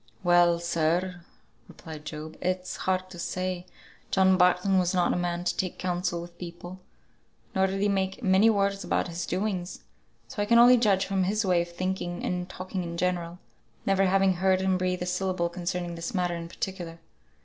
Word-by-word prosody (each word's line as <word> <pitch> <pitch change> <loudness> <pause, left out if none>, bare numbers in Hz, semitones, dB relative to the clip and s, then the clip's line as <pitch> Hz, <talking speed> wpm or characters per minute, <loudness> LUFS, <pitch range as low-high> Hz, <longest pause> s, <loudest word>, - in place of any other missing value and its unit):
"Well, 175 -1 +5
sir," 170 +2 0 0.5
replied 155 -3 -10
Job, 155 +1 -7
"it's 185 0 -2
hard 185 0 0
to 175 - -9
say: 185 +1 -3 0.4
John 190 -1 +4
Barton 180 +1 +3
was 180 0 +1
not 180 - +2
a - - -1
man 175 0 -1
to - - 0
take 185 -2 -2
counsel 175 -1 -1
with 170 0 -10
people; 175 +1 -8 0.7
nor 190 0 +3
did 195 +1 -3
he 205 - +3
make 195 +3 -1
many 195 +2 +5
words 200 -2 +1
about - - 0
his 170 0 -4
doings. 185 -1 -2 0.5
So 205 - -4
I 205 - 0
can 235 +2 +5
only 245 +1 +8
judge 200 -5 +3
from 195 -1 0
his 210 +3 0
way 180 -2 +3
of 170 - -5
thinking 180 0 -3
and 180 0 -2
talking 185 0 -5
in 170 -1 -5
general, 175 -1 -1 0.5
never 195 0 +3
having 190 -1 +3
heard 190 +1 +3
him 190 0 +1
breathe 180 0 -1
a - - -3
syllable 180 -1 -1
concerning 175 0 -3
this 170 +3 -5
matter 180 -2 0
in 170 0 -6
particular. 175 -3 -5
180 Hz, 185 wpm, -27 LUFS, 175-190 Hz, 0.7 s, only